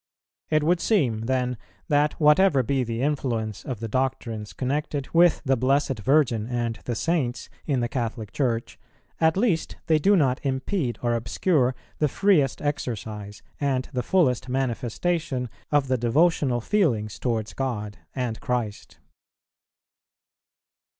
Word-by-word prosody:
It 155 Hz, -1 st, +2 dB
would 170 Hz, +3 st, +3 dB
seem 120 Hz, -, +1 dB
then 125 Hz, -2 st, 0 dB, 0.3 s
that 145 Hz, 0 st, +2 dB
whatever 150 Hz, -2 st, +5 dB
be 130 Hz, +2 st, 0 dB
the 115 Hz, +1 st, -3 dB
influence 120 Hz, -7 st, -1 dB
of 125 Hz, -5 st, -5 dB
the 115 Hz, -, -4 dB
doctrines 115 Hz, -3 st, -2 dB
connected 140 Hz, +1 st, -2 dB
with 170 Hz, 0 st, +4 dB
the 135 Hz, 0 st, +3 dB
Blessed 135 Hz, 0 st, +1 dB
Virgin 120 Hz, -2 st, +2 dB
and 120 Hz, -2 st, -2 dB
the 120 Hz, -, -2 dB
Saints 140 Hz, -3 st, -1 dB, 0.2 s
in 135 Hz, -5 st, +1 dB
the 120 Hz, -, 0 dB
Catholic 115 Hz, -4 st, -4 dB
Church, 120 Hz, -5 st, -2 dB, 0.4 s
at 160 Hz, +1 st, +3 dB
least 190 Hz, -8 st, +1 dB
they 160 Hz, -2 st, +3 dB
do 200 Hz, +7 st, +4 dB
not 135 Hz, -7 st, +2 dB
impede 130 Hz, -, -1 dB
or 120 Hz, -1 st, +2 dB
obscure 125 Hz, +3 st, +1 dB, 0.2 s
the 150 Hz, -, +3 dB
freest 150 Hz, -5 st, +2 dB
exercise 110 Hz, -7 st, -4 dB, 0.2 s
and 135 Hz, -3 st, 0 dB
the 125 Hz, -, 0 dB
fullest 130 Hz, -7 st, +1 dB
manifestation 130 Hz, +2 st, -1 dB, 0.2 s
of 145 Hz, -2 st, +3 dB
the 130 Hz, -1 st, +1 dB
devotional 130 Hz, 0 st, +2 dB
feelings 115 Hz, -, 0 dB
towards 110 Hz, -4 st, -2 dB
God 105 Hz, -6 st, -3 dB, 0.2 s
and 125 Hz, -4 st, -2 dB
Christ. 120 Hz, -4 st, -3 dB
130 Hz, 135 wpm, -25 LUFS, 115-150 Hz, 0.4 s, whatever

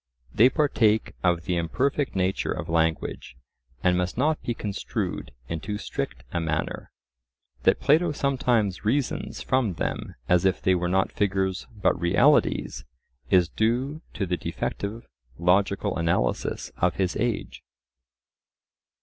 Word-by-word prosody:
They 120 Hz, +4 st, +6 dB
partake 115 Hz, -8 st, +2 dB
of 85 Hz, -2 st, +2 dB
the 90 Hz, 0 st, -1 dB
imperfect 130 Hz, -, 0 dB
nature 95 Hz, 0 st, 0 dB
of -, -, -4 dB
language, 80 Hz, -5 st, -1 dB, 0.5 s
and 90 Hz, -1 st, +4 dB
must 90 Hz, +3 st, -2 dB
not 150 Hz, +4 st, +1 dB
be 120 Hz, -, -2 dB
construed 100 Hz, -, -4 dB, 0.2 s
in 80 Hz, -, -3 dB
too 105 Hz, +5 st, -4 dB
strict -, -, -5 dB
a 85 Hz, -, -1 dB
manner. 80 Hz, -1 st, -2 dB, 0.8 s
That -, -, +4 dB
Plato 160 Hz, +4 st, +3 dB
sometimes 125 Hz, -8 st, 0 dB
reasons 130 Hz, +5 st, -1 dB
from 130 Hz, -7 st, +1 dB
them -, -, -3 dB
as 90 Hz, 0 st, +4 dB
if 95 Hz, -1 st, +2 dB
they 95 Hz, -, +2 dB
were 90 Hz, -1 st, 0 dB
not 95 Hz, +1 st, +1 dB
figures 95 Hz, -2 st, -1 dB
but 95 Hz, -, +1 dB
realities, 85 Hz, +2 st, +3 dB, 0.5 s
is 90 Hz, -2 st, +5 dB
due 125 Hz, -, -1 dB
to 100 Hz, -, -1 dB
the 90 Hz, -1 st, -1 dB
defective 105 Hz, +6 st, -4 dB, 0.3 s
logical 100 Hz, +3 st, +2 dB
analysis 85 Hz, -7 st, -1 dB
of -, -, +1 dB
his 95 Hz, -2 st, 0 dB
age. 120 Hz, -2 st, -2 dB
95 Hz, 130 wpm, -26 LUFS, 90-120 Hz, 0.8 s, They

